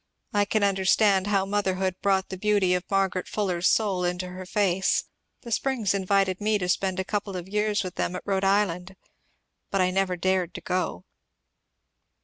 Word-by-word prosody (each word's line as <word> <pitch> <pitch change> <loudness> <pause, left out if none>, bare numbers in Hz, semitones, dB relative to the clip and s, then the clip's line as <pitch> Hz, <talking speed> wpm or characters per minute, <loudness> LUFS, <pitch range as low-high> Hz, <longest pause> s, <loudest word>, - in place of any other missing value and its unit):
I 205 -1 +3
can 210 +1 0
understand 195 0 +3
how 195 -2 +2
motherhood 190 -2 -1
brought 195 -1 +1
the 190 - -4
beauty 205 -3 +2
of 180 0 -2
Margaret 195 -2 0
Fuller's 180 -4 0
soul 195 -5 +1
into 180 +1 -2
her 185 0 -8
face. 190 -2 +1 0.4
The 235 - -8
Springs 230 -4 0
invited 195 0 +1
me 215 0 +2
to 180 -3 -3
spend 190 +1 0
a - - 0
couple 205 -1 -3
of 180 0 -7
years 210 +1 0
with 185 -2 -5
them 180 - -1
at - - -6
Rhode 195 -1 0
Island 190 -2 +1 0.4
(?) - - -49
but 195 - -1
I 185 0 +3
never 185 -1 0
dared 185 -1 0
to - - -6
go. 180 - -2
190 Hz, 180 wpm, -26 LUFS, 185-205 Hz, 0.4 s, I